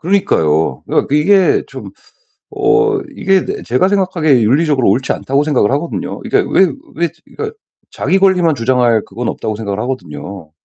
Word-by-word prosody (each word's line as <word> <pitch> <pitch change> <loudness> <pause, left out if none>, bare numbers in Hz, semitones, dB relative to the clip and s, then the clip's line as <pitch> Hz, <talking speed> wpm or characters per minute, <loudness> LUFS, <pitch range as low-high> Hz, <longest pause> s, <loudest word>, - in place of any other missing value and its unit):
그러니까요. 80 - +1
그러니까 140 - 0
이게 190 +5 +3
좀 - - -9 0.6
어 425 0 +2 0.2
이게 195 -1 +1
네 - - -4
제가 130 +10 +1
생각하기에 175 - +2
윤리적으로 140 +3 +2
옳지 130 +6 -1
않다고 140 +2 -1
생각을 135 -7 +1
하거든요. 145 +5 -3
이게 - - 0
왜 195 - +3 0.3
왜 170 +1 0 0.2
그러니까 440 0 -7 0.3
자기 190 - 0
권리만 180 -4 +3
주장할 120 -3 +1
그건 115 +4 -5
없다고 110 - -4
생각을 105 -2 -4
하거든요. 95 - -6
145 Hz, 385 characters per minute, -15 LUFS, 115-190 Hz, 0.6 s, 이게